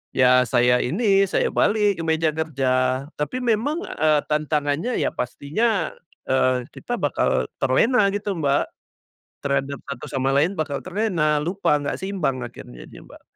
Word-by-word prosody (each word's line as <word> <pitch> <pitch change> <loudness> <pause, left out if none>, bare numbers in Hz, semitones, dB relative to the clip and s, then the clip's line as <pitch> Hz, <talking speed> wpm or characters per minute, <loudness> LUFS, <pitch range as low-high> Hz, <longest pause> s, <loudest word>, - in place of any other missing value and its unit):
ya 125 -1 +5
saya 125 +2 +3
ini 195 - +2
saya - - +1
balik 205 -3 +2
ke - - -3
meja 160 -1 +2
kerja. 130 -4 0
Tapi 150 +13 -2
memang, 245 - 0
eee, 155 -2 +1
tantangannya 150 - 0
ya - - +1
pastinya, 185 - -1 0.4
eee, 130 -1 +2
kita - - -4
bakal - - +1 0.2
terlena 210 - +3
gitu, 205 0 -2
Mbak, 140 -2 +1 0.8
terhadap 140 0 -1
satu 140 +1 -6
sama 135 0 0
lain 165 +7 +2
bakal 145 -3 -2
terlena, 180 -7 0
lupa 180 -1 +1
nggak 145 - -3
seimbang 185 -10 -2
akhirnya - - -11
dia, - - -12
Mbak. - - -16
150 Hz, 145 wpm, -23 LUFS, 135-195 Hz, 0.8 s, ya